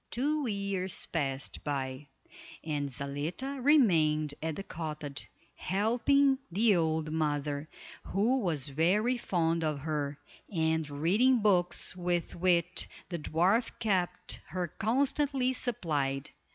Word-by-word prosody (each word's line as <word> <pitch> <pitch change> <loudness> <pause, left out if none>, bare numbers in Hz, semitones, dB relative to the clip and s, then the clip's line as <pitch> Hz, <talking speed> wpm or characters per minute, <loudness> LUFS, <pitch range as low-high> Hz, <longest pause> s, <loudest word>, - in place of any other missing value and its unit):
Two 290 +3 0
years 200 -3 -1
passed 135 -4 -3
by 135 -1 -3 0.6
and 145 -3 -2
Zaletta 150 - -4
remained 160 - +4
at 160 -1 -2
the 195 - -5
cottage, 150 -6 -6 0.2
helping 255 +7 +2
the 210 +3 +4
old 160 -2 0
mother, 150 -1 -1 0.4
who 225 +7 +1
was 160 - -1
very 190 - +2
fond 165 -5 0
of 150 -3 -1
her, 145 -2 -2 0.3
and 160 -3 0
reading 205 - +3
books 180 -4 +2
with 175 -2 -1
which 175 0 +1 0.2
the 170 -2 -3
dwarf 185 +10 +2
kept 180 -4 -1
her 180 +1 -2
constantly 265 - +1
supplied. 150 - -1
175 Hz, 110 wpm, -31 LUFS, 150-220 Hz, 0.6 s, remained